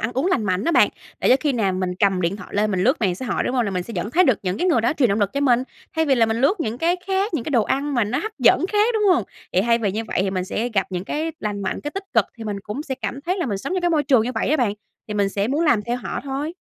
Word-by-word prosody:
ăn 230 +3 -2
uống 265 +7 0
lành 370 - +1
mạnh 185 0 0
á 335 - +1
bạn, - - +5 0.3
để - - +2
cho 255 - +7
khi 290 0 +1
nào 210 -6 +1
mình 185 -1 -2
cầm 190 0 +2
điện 175 +3 0
thoại 185 - -10
lên 210 +1 +1
mình 185 -2 0
lướt 260 +7 +2
mạng 190 -5 +1
xã 255 +8 -6
hội, 215 - 0
đúng 250 - -1
hông? 245 -2 +2
Là 200 - -2
mình 180 -2 -2
sẽ 230 - -9
vẫn 210 - -2
thấy 365 +7 +4
được 260 -7 +3
những 185 -1 -1
cái 355 - +1
người 320 -10 +3
đó 230 - +1
truyền 280 -6 +2
động 200 +1 0
lực 200 -1 +1
cho 280 - -1
mình, 255 -3 +3 0.3
thay 320 - +3
vì 275 - +4
là 230 -3 +3
mình 225 0 -1
lướt 315 +9 +2
những 230 -3 -2
cái 340 +4 +2
khác, 390 0 0
những 260 -8 -2
cái - - -4
đồ 240 -6 +3
ăn 280 +5 -1
mà 240 -3 +2
nó 215 +5 -1
hấp 435 +1 -4
dẫn - - +4
khác, 420 +1 +3
đúng 435 - +1
hông? 240 - +1 0.3
Thì 180 - +3
thay 230 +3 +2
vì 210 -4 0
như 220 +3 -3
vậy - - -3
thì 195 - -1
mình 185 -1 -2
sẽ 225 +5 -2
gặp 200 -5 0
những 180 0 -3
cái 315 +8 -2
lành 205 -1 -3
mạnh, 190 - -2
cái 295 - -4
tích 390 +4 -6
cực, - - +5
thì 225 - -8
mình 205 -2 -4
cũng 210 +8 -5
sẽ 270 -3 -4
cảm 265 +1 -5
thấy 355 +6 -2
là 345 - -1
mình 205 -5 -2
sống 265 - -4
trong 370 - 0
cái 350 0 +1
môi 310 -3 +2
trường 260 -5 +4
như 245 +3 -3
vậy 225 - -1
á 310 - +3
bạn, 240 -8 +1 0.4
thì 210 - -4
mình 200 -1 +2
sẽ 200 +2 -1
muốn 300 +5 +1
làm 245 -9 +3
theo 240 +3 -2
họ 250 - -5
thôi. 280 +4 -3
240 Hz, 350 wpm, -22 LUFS, 205-295 Hz, 0.4 s, cho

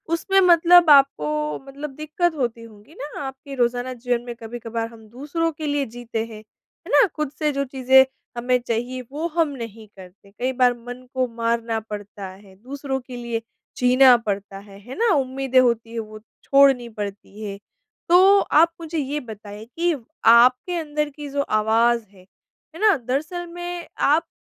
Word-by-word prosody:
उसमें 390 +3 +2
मतलब 345 -1 +6
आपको 150 - +3
मतलब 285 +2 -7
दिक्कत 310 +2 -1
होती 235 -4 -3
होगी 215 +6 -16
ना, 290 0 -8
आपकी 270 +1 -7
रोज़ाना 245 +1 0
जीवन 245 0 -2
में 240 -1 -6
कभी-कभार 230 0 -5
हम 225 -2 -15
दूसरों 300 +7 -2
के 305 0 -6
लिए 285 -1 0
जीते 230 -1 -5
हैं। 220 -2 -10
है 215 - -21
ना? - - +6
खुद 305 -3 -3
से 300 -1 +1
जो 280 0 -1
चीज़ें 265 0 +4 0.3
हमें 250 +1 +2
चाहिए, 245 +2 -2
वो 315 +4 -3
हम 325 -2 0
नहीं 230 -5 -8
करते। 190 +2 -15
कई 250 +5 -2
बार 250 -1 +3
मन 245 +2 -10
को 255 -1 0
मारना 230 -1 -1
पड़ता 205 -2 -8
है, 190 0 -16
दूसरों 265 +4 -5
के 255 0 -11
लिए 235 -1 -4 0.4
जीना 250 0 +6
पड़ता 200 -3 -4
है, 200 0 -14
है 245 +6 -10
ना? 460 -2 +2
उम्मीदें 265 -1 +1
होती 235 -2 +1
हैं, 230 - -3
वो 215 -1 -8 0.2
छोड़नी 275 -4 +4
पड़ती 205 0 -7
हैं। 200 -1 -5 0.5
तो 380 +3 +7
आप 330 0 +3
मुझे 325 0 -5
ये 290 +1 -2
बताइए 215 -3 -10
कि 335 +7 -1 0.3
आपके 250 +9 +5
अंदर 300 -2 -2
की 295 0 -9
जो 280 0 -1 0.2
आवाज़ 230 +2 +2
है, 190 -2 -19 0.5
है - - -9
ना? 425 -5 +5
दरअसल 295 +9 -3
में, 350 -1 -6
आप 320 +4 +2
250 Hz, 170 wpm, -22 LUFS, 225-295 Hz, 0.5 s, तो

